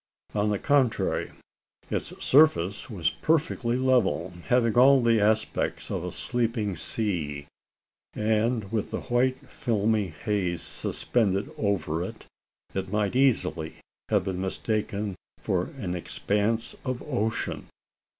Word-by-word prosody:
On 105 Hz, 0 st, +1 dB
the 105 Hz, -, +1 dB
contrary, 135 Hz, -1 st, +1 dB, 0.6 s
its -, -, -1 dB, 0.2 s
surface 130 Hz, -, +4 dB
was 95 Hz, -8 st, 0 dB
perfectly 140 Hz, -6 st, 0 dB
level 120 Hz, -, +2 dB
having 120 Hz, -2 st, +3 dB
all 135 Hz, +2 st, +7 dB
the 115 Hz, -2 st, +3 dB
aspect 110 Hz, +1 st, 0 dB
of -, -, -2 dB
a -, -, -4 dB
sleeping 115 Hz, -5 st, -1 dB
sea; 80 Hz, -7 st, -1 dB, 0.7 s
and 110 Hz, 0 st, 0 dB
with 110 Hz, -3 st, -1 dB
the -, -, -3 dB
white 130 Hz, +3 st, 0 dB
filmy 110 Hz, -6 st, 0 dB
haze 90 Hz, +1 st, -2 dB
suspended 100 Hz, -4 st, -1 dB
over 85 Hz, -6 st, -1 dB
it, 90 Hz, -, -6 dB, 0.5 s
it 95 Hz, -1 st, -3 dB
might 105 Hz, +1 st, 0 dB
easily 120 Hz, -11 st, +2 dB, 0.3 s
have 105 Hz, -4 st, +3 dB
been 95 Hz, -1 st, -3 dB
mistaken 105 Hz, +1 st, -2 dB, 0.3 s
for 90 Hz, -1 st, 0 dB
an 95 Hz, -8 st, -3 dB
expanse 105 Hz, +5 st, -1 dB
of 130 Hz, -2 st, -3 dB
ocean. 115 Hz, -6 st, -2 dB
110 Hz, 120 wpm, -27 LUFS, 95-120 Hz, 0.7 s, all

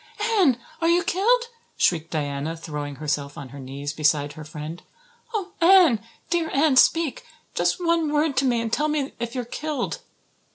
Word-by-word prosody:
"Anne, 410 Hz, -, +3 dB, 0.2 s
are 330 Hz, -, +2 dB
you 345 Hz, +1 st, +4 dB
killed?" 410 Hz, +7 st, +3 dB, 0.4 s
shrieked 165 Hz, -2 st, +2 dB
Diana, 145 Hz, +1 st, -3 dB
throwing 150 Hz, -3 st, -5 dB
herself 145 Hz, -1 st, -3 dB
on 135 Hz, -, -8 dB
her 140 Hz, -, -10 dB
knees 140 Hz, +2 st, -5 dB
beside 145 Hz, -1 st, +1 dB
her 155 Hz, -, -9 dB
friend. 155 Hz, +2 st, -7 dB, 0.5 s
"Oh, 400 Hz, -5 st, -3 dB
Anne, 340 Hz, -, +6 dB, 0.3 s
dear 340 Hz, -2 st, +1 dB
Anne, 285 Hz, 0 st, +3 dB
speak 325 Hz, +1 st, +3 dB, 0.3 s
just -, -, +1 dB
one 335 Hz, -3 st, +1 dB
word 300 Hz, -1 st, +1 dB
to 275 Hz, -, +3 dB
me 240 Hz, -3 st, +2 dB
and 225 Hz, 0 st, -4 dB
tell 300 Hz, -, +2 dB
me 295 Hz, -2 st, -1 dB
if 235 Hz, +2 st, -4 dB
you're 250 Hz, -2 st, -2 dB
killed." 290 Hz, +1 st, -3 dB
250 Hz, 170 wpm, -24 LUFS, -, 0.5 s, Anne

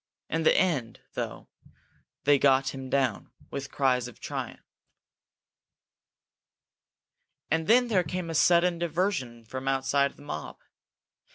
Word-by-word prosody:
In 165 Hz, -, 0 dB
the 160 Hz, -, +4 dB
end, 145 Hz, -12 st, 0 dB
though, -, -, -5 dB, 0.8 s
they 145 Hz, -1 st, +5 dB
got 135 Hz, -1 st, +3 dB
him 135 Hz, -1 st, -7 dB
down, 130 Hz, -6 st, 0 dB, 0.2 s
with 140 Hz, 0 st, -5 dB
cries 130 Hz, -3 st, +1 dB
of 125 Hz, -, -13 dB
triumph. -, -, -6 dB, 2.9 s
And 160 Hz, +1 st, +1 dB
then 245 Hz, +2 st, +5 dB
there 200 Hz, -6 st, +3 dB
came 175 Hz, +1 st, -4 dB
a -, -, -4 dB
sudden 170 Hz, +1 st, +4 dB
diversion 165 Hz, -, -2 dB
from 130 Hz, +4 st, -6 dB
outside 135 Hz, +1 st, +1 dB
the -, -, -16 dB
mob. 75 Hz, -, -6 dB
140 Hz, 120 wpm, -28 LUFS, 130-170 Hz, 2.9 s, they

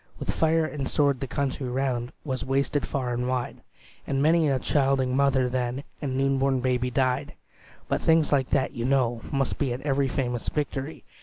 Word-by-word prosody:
"With -, -, -2 dB
fire 160 Hz, 0 st, +2 dB
and 145 Hz, -3 st, -3 dB
sword 140 Hz, -3 st, +2 dB
the 135 Hz, -, -4 dB
country 135 Hz, 0 st, -2 dB
round 125 Hz, -1 st, -1 dB
Was 130 Hz, -3 st, -2 dB
wasted 140 Hz, +2 st, 0 dB
far 125 Hz, -3 st, -2 dB
and 125 Hz, +1 st, -1 dB
wide, 125 Hz, -1 st, -2 dB, 0.5 s
And 135 Hz, -1 st, 0 dB
many 160 Hz, +1 st, +4 dB
a 135 Hz, -, +2 dB
childing 135 Hz, -2 st, +1 dB
mother 135 Hz, -2 st, +3 dB
then 125 Hz, +1 st, -2 dB, 0.2 s
And 130 Hz, -3 st, -2 dB
new 135 Hz, 0 st, +2 dB
born 135 Hz, -1 st, +2 dB
baby 125 Hz, 0 st, 0 dB
died: 130 Hz, +3 st, 0 dB, 0.5 s
But -, -, 0 dB
things 160 Hz, -1 st, +3 dB
like 135 Hz, -3 st, +2 dB
that, 135 Hz, -2 st, +1 dB
you 115 Hz, -, -4 dB
know, 125 Hz, -3 st, +1 dB
must 135 Hz, -3 st, -1 dB
be 135 Hz, -4 st, 0 dB
At 125 Hz, -, -6 dB
every 140 Hz, -1 st, +1 dB
famous 125 Hz, -3 st, -2 dB
victory. 145 Hz, 0 st, -3 dB
135 Hz, 185 wpm, -26 LUFS, 125-140 Hz, 0.5 s, many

